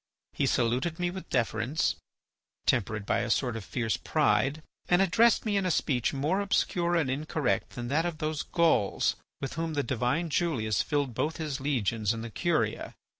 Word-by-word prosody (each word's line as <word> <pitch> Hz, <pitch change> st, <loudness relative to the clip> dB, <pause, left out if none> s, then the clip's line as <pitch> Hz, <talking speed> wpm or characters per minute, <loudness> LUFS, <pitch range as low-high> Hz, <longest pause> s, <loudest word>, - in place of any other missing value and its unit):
He -, -, 0 dB
saluted 125 Hz, +8 st, +1 dB
me 175 Hz, 0 st, -1 dB
with 190 Hz, +1 st, -8 dB
deference, 120 Hz, +4 st, 0 dB, 0.7 s
tempered 105 Hz, 0 st, 0 dB
by -, -, +1 dB
a 120 Hz, -, -2 dB
sort 120 Hz, 0 st, +1 dB
of 115 Hz, -, -5 dB
fierce 115 Hz, +2 st, -1 dB
pride, 145 Hz, +3 st, +1 dB, 0.3 s
and 175 Hz, -, +5 dB
addressed 225 Hz, +6 st, +4 dB
me 210 Hz, -2 st, +1 dB
in 195 Hz, -, 0 dB
a -, -, +1 dB
speech 130 Hz, -7 st, +1 dB
more 150 Hz, +8 st, 0 dB
obscure 175 Hz, -3 st, +1 dB
and 165 Hz, -5 st, +2 dB
incorrect 145 Hz, 0 st, -1 dB
than 120 Hz, -1 st, -4 dB
that 160 Hz, +5 st, +1 dB
of 170 Hz, -3 st, -4 dB
those 155 Hz, -1 st, -2 dB
Gauls 165 Hz, -, +2 dB, 0.3 s
with 135 Hz, -, -3 dB
whom 165 Hz, -1 st, -3 dB
the 145 Hz, -, +1 dB
divine 130 Hz, +7 st, -1 dB
Julius 125 Hz, -11 st, +1 dB
filled 145 Hz, -4 st, -1 dB
both 155 Hz, +7 st, -1 dB
his 150 Hz, -4 st, -3 dB
legions 115 Hz, -6 st, 0 dB
and 115 Hz, 0 st, -5 dB
the 115 Hz, -, -6 dB
Curia. 155 Hz, -8 st, -1 dB
145 Hz, 175 wpm, -29 LUFS, 120-170 Hz, 0.7 s, and